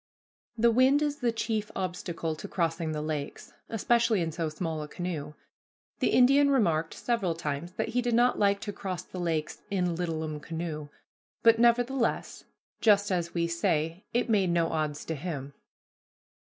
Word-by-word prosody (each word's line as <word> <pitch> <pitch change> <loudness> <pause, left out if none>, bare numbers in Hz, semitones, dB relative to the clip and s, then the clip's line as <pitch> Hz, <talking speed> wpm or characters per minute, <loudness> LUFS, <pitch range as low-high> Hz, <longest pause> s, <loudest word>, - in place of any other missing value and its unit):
The 235 +1 +4
wind 260 +5 +4
is 290 -1 -1
the 245 -4 +1
chief 220 -2 -2
obstacle 175 -3 -3
to 200 - -7
crossing 165 -3 -1
the 150 -1 -3
lakes, 150 -2 -5 0.2
especially 230 -1 +2
in 165 -1 -1
so 160 0 -2
small 160 0 -3
a 150 - -5
canoe. 150 -3 -5 0.6
The - - +2
Indian 275 +3 +5
remarked 165 - +2
several 210 -9 -1
times 160 +2 -4
that - - -2
he 245 +2 +1
did 240 -1 0
not 245 +1 +3
like 200 -1 +3
to 205 -2 -4
cross 185 -3 -4
the 185 - -8
lakes 160 -3 -2
"in 180 -3 0
littlum 160 -3 -3
canoe," 160 -2 -5 0.5
but 230 0 +6
nevertheless, 240 +1 +1 0.3
"just 205 -2 +4
as 175 -2 -1
we 170 0 +2
say, 165 +1 0
it 240 +2 +1
made 200 -5 +2
no 170 -1 +2
odds 155 -2 -2
to 165 - -2
him." 145 -3 -5
180 Hz, 165 wpm, -29 LUFS, 160-230 Hz, 0.6 s, but